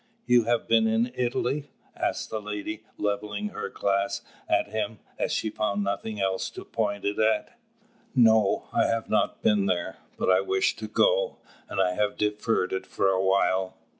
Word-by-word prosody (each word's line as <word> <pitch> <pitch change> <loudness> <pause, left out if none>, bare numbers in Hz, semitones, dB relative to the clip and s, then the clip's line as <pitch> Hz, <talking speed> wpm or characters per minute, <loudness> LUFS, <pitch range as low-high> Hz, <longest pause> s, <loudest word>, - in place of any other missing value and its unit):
"You 120 -2 +4
have 120 0 +1
been 115 -1 +4
in 115 +2 +1
Italy?" 130 +3 -1 0.3
asked - - -2
the 110 - -2
lady, 105 +1 -5
levelling 105 0 -2
her - - -5
glass 100 0 0 0.3
at - - +2
him, 110 0 -2 0.2
as - - 0
she 110 - -1
found 105 -1 -1
nothing 105 +2 -3
else 95 -1 0
to - - -7
point 100 -3 -2
it 100 0 -1
at. 110 - +1 0.6
"No, 110 -5 +4
I - - +3
have 115 -1 -1
not 110 - +1
been 105 -2 +3
there; 90 -2 -1 0.2
but - - -1
I 95 0 +5
wish 95 -1 +1
to 110 - -5
go, - - +2 0.3
and - - -3
I 90 -1 +3
have 105 +1 0
deferred 105 -2 0
it 95 - -3
for 95 - +1
a 95 -1 +2
while. 95 -1 +1
105 Hz, 175 wpm, -27 LUFS, 100-110 Hz, 0.6 s, I